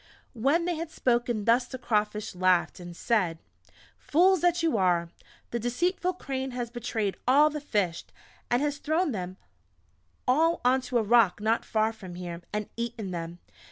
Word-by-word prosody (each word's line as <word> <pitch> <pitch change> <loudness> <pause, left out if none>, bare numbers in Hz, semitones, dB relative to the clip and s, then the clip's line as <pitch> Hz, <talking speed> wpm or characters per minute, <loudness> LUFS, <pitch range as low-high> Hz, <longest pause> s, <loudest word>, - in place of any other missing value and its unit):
When 280 +8 +1
they 350 -2 -1
had 330 0 -4
spoken 240 -7 0
thus 240 +2 +3
the 260 - -6
Crawfish 210 -3 -1
laughed, 185 -1 +2
and 175 -1 -9
said: 185 -8 +1 0.6
"Fools 365 +3 +3
that 350 -1 +2
you 325 -7 +2
are! 175 -4 +2 0.4
The 235 - -1
deceitful 355 - 0
Crane 265 -6 -4
has 240 -1 -3
betrayed 225 -4 -2
all 295 +4 +5
the 300 0 -5
Fish, 200 - -1 0.5
and 245 +3 +2
has 290 -1 -1
thrown 315 +2 0
them 185 -3 -5 0.9
all 320 +6 +3
onto 255 0 +2
a 230 - +2
Rock 215 -4 +4
not 220 +2 +1
far 220 0 0
from 190 -5 -10
here, 175 -1 -6
and 210 0 -3
eaten 230 -4 -4
them. 170 -1 -5
235 Hz, 160 wpm, -28 LUFS, 200-285 Hz, 0.9 s, all